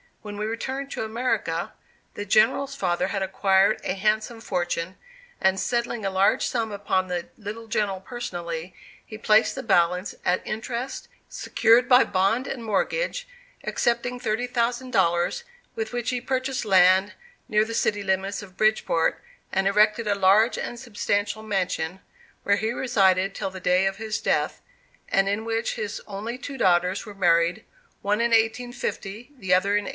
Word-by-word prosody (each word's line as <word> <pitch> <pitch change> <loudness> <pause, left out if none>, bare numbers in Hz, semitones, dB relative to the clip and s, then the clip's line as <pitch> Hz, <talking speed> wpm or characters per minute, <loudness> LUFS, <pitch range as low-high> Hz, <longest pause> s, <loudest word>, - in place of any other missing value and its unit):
When 205 -1 -7
we 210 - -2
returned 265 +5 -4
to - - -3
America, 220 -7 -2 0.4
the 205 - -5
General's 270 +7 +3
father 180 -5 0
had 195 0 -2
acquired 195 +2 +2
a - - -1
handsome 215 +3 0
fortune, 175 -2 -2 0.4
and 190 0 +2
settling 235 -2 -1
a 195 - 0
large 190 +1 +3
sum 225 -3 -1
upon 195 -2 -1
the 175 -1 -4
little 220 +2 -7
General 210 -4 -1
personally, 175 -6 -6 0.3
he 215 - -9
placed 215 0 +3
the 265 - -5
balance 180 -2 +2
at 180 - +1
interest, 235 +4 -4 0.2
secured 235 +2 +3
by 250 0 +7
bond 195 +7 +1
and 245 -3 -5
mortgage, 485 - -1 0.4
excepting 245 +1 -1
thirty 235 0 -1
thousand 245 +1 -1
dollars, 175 - +1 0.3
with 450 -1 -3
which 245 -1 -2
he 250 -1 -2
purchased 260 0 -2
land 190 0 +5 0.3
near 215 0 +3
the 230 - -6
city 205 -2 0
limits 195 +1 -1
of 185 -1 -14
Bridgeport, 215 -6 +1 0.3
and 190 0 +1
erected 210 +2 +3
a 205 - +2
large 200 +4 +4
and 240 - -5
substantial 205 -3 -2
mansion, 190 -4 -2 0.4
where 200 0 +3
he 220 +1 -1
resided 195 -6 +2
till - - -3
the 190 - -8
day 180 +1 +2
of 195 0 -2
his 220 0 -3
death, - - 0 0.5
and 195 0 +2
in 210 +2 -2
which 225 0 -1
his 215 -2 -4
only 215 +4 -5
two 275 +1 -7
daughters 180 +3 +2
were 205 - -9
married, 175 +2 +2 0.4
one 205 +2 +1
in 235 0 +1
1850, 230 0 -1
the 190 -6 0
other 185 +2 +3
in 205 - 0
1853. - - -4
210 Hz, 160 wpm, -25 LUFS, 190-235 Hz, 0.5 s, by